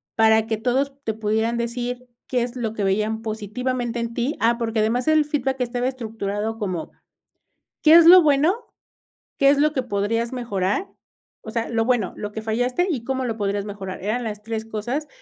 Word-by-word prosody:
para 220 Hz, 0 st, +4 dB
que 220 Hz, -1 st, -1 dB
todos 260 Hz, +5 st, 0 dB
te 220 Hz, -, -1 dB
pudieran 220 Hz, +2 st, 0 dB
decir 245 Hz, +1 st, -3 dB, 0.2 s
qué 250 Hz, -2 st, 0 dB
es 245 Hz, +1 st, -5 dB
lo 230 Hz, -3 st, -3 dB
que 210 Hz, -, -3 dB
veían 215 Hz, +3 st, 0 dB
positivamente 235 Hz, +3 st, -3 dB
en 235 Hz, 0 st, -3 dB
ti 245 Hz, +6 st, -2 dB
ah, 235 Hz, +1 st, +3 dB
porque 225 Hz, -1 st, -1 dB
además, 230 Hz, +3 st, +1 dB
el 310 Hz, -1 st, +4 dB
feedback 270 Hz, -3 st, -1 dB
estaba 245 Hz, 0 st, -1 dB
estructurado 220 Hz, -3 st, -3 dB
como: 185 Hz, -6 st, -3 dB, 0.9 s
"¿Qué 310 Hz, -, +6 dB
es 335 Hz, -1 st, +8 dB
lo 360 Hz, +2 st, +10 dB
bueno? 300 Hz, +2 st, +4 dB, 0.8 s
¿Qué 275 Hz, -, +5 dB
es 285 Hz, -, +4 dB
lo 300 Hz, +1 st, +3 dB
que 260 Hz, -, 0 dB
podrías 230 Hz, +1 st, -1 dB
mejorar?", 215 Hz, -, -1 dB, 0.5 s
o -, -, -9 dB
sea, 230 Hz, 0 st, -2 dB
lo 225 Hz, -1 st, +1 dB
bueno, 240 Hz, -6 st, +1 dB
lo 210 Hz, -1 st, -5 dB
que 220 Hz, -, -5 dB
fallaste 245 Hz, +10 st, 0 dB
y 265 Hz, -9 st, -2 dB
cómo 260 Hz, +1 st, -2 dB
lo 230 Hz, -2 st, -2 dB
podrías 200 Hz, -1 st, -2 dB
mejorar, 195 Hz, -3 st, -7 dB
eran 220 Hz, +5 st, -1 dB
las 210 Hz, -2 st, -5 dB
3 225 Hz, 0 st, -3 dB
cosas, 240 Hz, +7 st, -3 dB
230 Hz, 190 wpm, -23 LUFS, 220-255 Hz, 0.9 s, lo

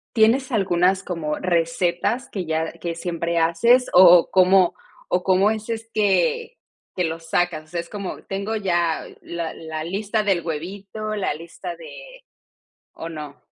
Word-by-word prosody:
¿Tienes 245 Hz, +5 st, +3 dB
algunas 190 Hz, -2 st, +2 dB
como 155 Hz, -4 st, -3 dB
recetas 175 Hz, +8 st, 0 dB
que 185 Hz, -4 st, -4 dB
ya 160 Hz, 0 st, -2 dB
que 170 Hz, -1 st, -5 dB
siempre 170 Hz, 0 st, -2 dB
haces, 230 Hz, +11 st, +3 dB
o 180 Hz, -1 st, +9 dB
o -, -, -4 dB
cómo 185 Hz, -1 st, +5 dB, 0.4 s
o 180 Hz, 0 st, +1 dB
cómo 195 Hz, +3 st, +3 dB
es 220 Hz, 0 st, -5 dB
es 225 Hz, 0 st, -4 dB
que 465 Hz, -, +1 dB, 0.4 s
que 180 Hz, -, 0 dB
los 165 Hz, 0 st, -4 dB
sacas?, 165 Hz, -3 st, 0 dB
o -, -, -25 dB
sea, 170 Hz, +1 st, -4 dB
es 170 Hz, -, -6 dB
como 200 Hz, -3 st, -6 dB
tengo 200 Hz, +3 st, -3 dB
ya 175 Hz, -5 st, 0 dB, 0.2 s
la 170 Hz, -1 st, -5 dB
la 160 Hz, -1 st, -6 dB
lista 205 Hz, +5 st, -1 dB
del 195 Hz, -4 st, +1 dB
huevito, 200 Hz, +6 st, -5 dB
la 200 Hz, -, -1 dB
lista 170 Hz, -, -8 dB
de -, -, -12 dB, 0.7 s
¿o 165 Hz, -, -7 dB
no? 150 Hz, -3 st, -8 dB
185 Hz, 160 wpm, -22 LUFS, 170-215 Hz, 0.7 s, o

